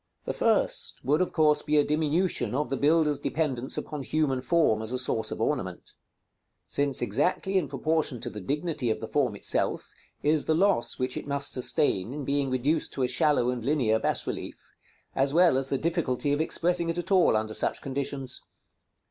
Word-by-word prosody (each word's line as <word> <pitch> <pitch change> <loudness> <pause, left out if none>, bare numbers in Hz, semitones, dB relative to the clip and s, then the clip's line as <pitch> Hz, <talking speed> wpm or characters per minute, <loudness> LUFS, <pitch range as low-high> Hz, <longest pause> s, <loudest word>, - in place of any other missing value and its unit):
§ - - -54
XXXVIII. - - -48
The - - -2
first - - 0
would 150 +6 +2
of 185 - 0
course 155 -2 +3
be 150 0 0
a 145 - +5
diminution 155 0 0
of 150 +2 -1
the 135 - -1
builder's 150 0 +2
dependence 135 -5 -2
upon 150 -2 -5
human 135 -2 0
form 145 -7 +2
as 110 +1 -5
a 130 - -1
source 120 -3 -1
of - - -5
ornament: - - -3 0.7
since 140 -3 +1
exactly 180 - 0
in 180 -6 +2
proportion 145 -1 -1
to 120 -1 -5
the 105 - -7
dignity 150 - -2
of 110 - -1
the 110 - -6
form 125 -6 0
itself - - -1 0.3
is 150 0 +2
the 160 - +2
loss 190 -7 +2
which 130 0 -2
it - - -6
must 140 0 +2
sustain 125 - +1
in 145 -1 -5
being 140 0 0
reduced 135 +5 0
to 135 - -1
a - - +2
shallow 125 -1 +2
and 125 -2 -5
linear 125 -5 +1
bas - - +1
relief, - - -7 0.4
as 135 +2 +1
well 175 -4 +5
as 135 0 0
the 135 - 0
difficulty 145 -4 -1
of 145 - 0
expressing 170 +1 0
it 165 - -2
at 175 +3 -4
all 180 - +4
under 110 0 -3
such - - +1
conditions. 135 -1 -4
140 Hz, 200 wpm, -27 LUFS, 125-155 Hz, 0.7 s, a